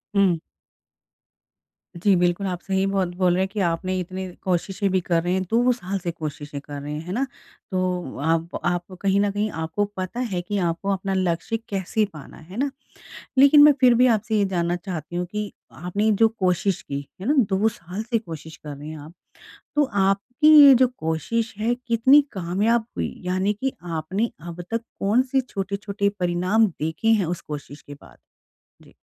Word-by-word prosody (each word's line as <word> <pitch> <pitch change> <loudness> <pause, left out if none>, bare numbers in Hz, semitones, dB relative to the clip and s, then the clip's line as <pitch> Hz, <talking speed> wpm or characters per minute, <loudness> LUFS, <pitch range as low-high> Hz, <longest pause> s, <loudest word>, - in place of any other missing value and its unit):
हुँ। 190 -5 +3 1.6
जी, 195 +3 +3
बिल्कुल। 175 +2 +1
आप 180 -1 -3
सही 190 0 0
बहुत 195 -2 +1
बोल 180 -1 +2
रहे 180 - +1
हैं, - - -1
कि 205 +2 -6
आपने 185 +1 0
इतनी 185 +1 -5 0.2
कोशिशें 190 +2 0
भी 185 - +3
कर 170 -1 +1
रहे 175 +1 0
हैं 190 - +1
2 240 +2 +3
साल 200 -5 -3
से 175 -1 -3
कोशिशें 150 -2 -6
कर 145 -1 -8
रहे 145 - -6
हैं। 150 - -4
है 180 - -6
ना? 260 +6 0 0.5
तो 180 -5 -2
आप, 165 +3 0
आप 175 +1 -1
कहीं 200 0 +2
न 205 -1 +1
कहीं 210 +1 -1
आपको 160 +5 -2
पता 185 +6 -4
है 205 -8 -2
कि 205 +3 -3
आपको 170 +4 -3
अपना 195 0 -2
लक्ष्य 185 +3 0
कैसे 200 +2 0
पाना 150 -3 -11
है। - - -14
है 195 - -8
ना? 275 +2 0 0.7
लेकिन 280 +2 +8
मैं 295 - +9
फिर 250 -2 +6
भी 250 +2 +5
आपसे 215 0 -1
ये 205 - +3
जानना 175 0 +1
चाहती 175 -3 -6
हूँ 180 0 -1
कि 210 -1 -3 0.2
आपने 200 +6 -1
जो 225 - +7
कोशिश 190 -3 0
की, 140 0 -5
है 195 - -6
ना? 290 - +3 0.2
2 195 +3 +3
साल 185 -1 -6
से 230 0 0
कोशिश 160 -5 -9
कर 150 -2 -9
रहे 145 +2 -9
हैं 155 0 -7
आप। 150 +3 -11 0.6
तो 295 - +5 0.2
आपकी 235 +10 +2 0.2
ये 275 - +9
जो 255 +1 +5
कोशिश 160 +9 -2
है 230 +3 +1
कितनी 250 +3 +4
कामयाब 205 +6 +1
हुई - - -2
यानी 185 +3 +1
कि 265 0 0
आपने 175 +6 -2 0.2
अब 170 +1 -7
तक 230 0 0 0.2
कौन-से 255 +6 +2
छोटे-छोटे 200 -3 -2
परिणाम 180 +5 +2
देखे 160 +2 -3
हैं 215 -5 +4
उस 175 +1 -3
कोशिश 145 -1 -8
के 145 - -10
बाद? 140 - -18 0.6
जी। - - -19
190 Hz, 190 wpm, -23 LUFS, 170-215 Hz, 1.6 s, मैं